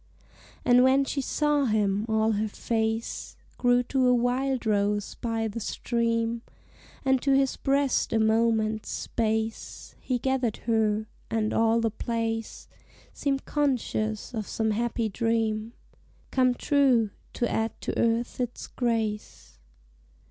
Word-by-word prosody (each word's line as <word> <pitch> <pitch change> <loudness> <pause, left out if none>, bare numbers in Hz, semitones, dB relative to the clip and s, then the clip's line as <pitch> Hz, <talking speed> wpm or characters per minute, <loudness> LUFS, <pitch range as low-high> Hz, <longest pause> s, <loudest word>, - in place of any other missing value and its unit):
And 245 0 +6
when 265 +1 +4
she 275 - -2
saw 295 +1 +1
him, 210 -2 +1
all 220 0 +2
her 215 0 0
face 225 +1 -2 0.2
Grew 245 0 +4
to 260 0 +1
a 250 - +5
wildrose 235 -5 0
by 225 -1 -2
the 220 +2 -5
stream; 230 0 -1 0.6
And 265 -1 +3
to 275 -1 +3
his 270 -1 +1
breast 275 -1 +1
a - - +2
moment's 220 -1 +2
space 220 -1 -3
He 255 - -1
gathered 255 -3 0
her; 220 -2 +1 0.2
and 220 -1 0
all 225 0 +3
the 225 -1 +1
place 225 0 -3 0.5
Seemed 275 -1 -1
conscious 245 -7 -1
of 215 -3 -3
some 220 -1 0
happy 230 +1 -1
dream 225 +1 -1 0.6
Come 255 -1 +3
true 255 -7 +3 0.2
to 240 - 0
add 225 0 -2
to - - -3
Earth 230 +2 0
its 245 -1 -3
grace. 210 - -3
230 Hz, 125 wpm, -27 LUFS, 220-250 Hz, 0.6 s, And